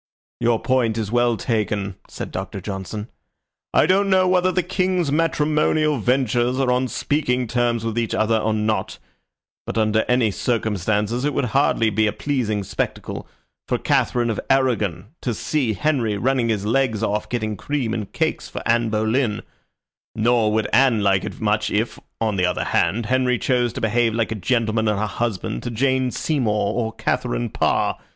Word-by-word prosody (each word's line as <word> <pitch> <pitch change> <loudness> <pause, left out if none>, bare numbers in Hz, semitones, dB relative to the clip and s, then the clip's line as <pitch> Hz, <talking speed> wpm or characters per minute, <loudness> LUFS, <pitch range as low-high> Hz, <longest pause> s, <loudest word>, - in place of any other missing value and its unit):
"Your 115 -1 +2
point 120 -4 +1
is 110 -2 -3
well 120 -1 +2
taken," 105 -4 -1 0.2
said - - -6
Doctor 95 +1 -5
Johnson. 100 +2 -5 0.6
"I - - +4
don't 195 +2 +3
know 185 -1 +4
whether 185 0 +3
the 185 0 0
King's 180 -3 0
matrimonial 155 -1 +1
ventures 125 +1 +1
are 130 -2 +2
on 125 +1 +1
speaking 125 -2 0
terms 120 -1 0
with 115 0 -1
each 115 -2 -1
other 110 +1 +2
or 110 +1 0
not, 110 -2 -1 0.7
but - - -3
under 110 0 +2
any 125 -3 +2
circumstances 110 +2 -1
it 145 0 0
would 140 - +1
hardly 115 -5 +3
be 110 +1 +2
a - - +1
pleasing 115 -8 -1
spectacle 100 +2 -4 0.4
for - - +1
Katharine 120 -1 +1
of 110 - -3
Arragon 110 -9 +1
to 120 -3 -2
see 130 -1 0
Henry 120 -4 0
running 125 +1 +1
his 105 -3 -1
legs 115 -2 +1
off 105 0 -1
getting 110 -3 -2
cream 125 +1 -2
and 105 -4 -4
cakes - - -1
for - - -6
Anne 115 0 +2
Boleyn; 110 +1 0 0.7
nor 115 -1 +2
would 110 0 +1
Anne 130 -5 +4
like 95 -2 +2
it - - -7
much 105 -1 +1
if, 110 +3 -1 0.2
on 110 -3 0
the 90 - +2
other 90 - -1
hand, 115 +2 +1
Henry 125 +1 +2
chose 125 -2 +1
to 130 - -5
behave 115 0 +1
like 115 -1 0
a - - +1
gentleman 110 +1 0
and 105 -1 +1
a 110 - 0
husband 105 - -3
to - - -4
Jane 130 +2 +1
Seymour 110 -8 0
or 115 -2 -1
Katharine - - -1
Parr. - - +1
115 Hz, 175 wpm, -22 LUFS, 105-130 Hz, 0.7 s, I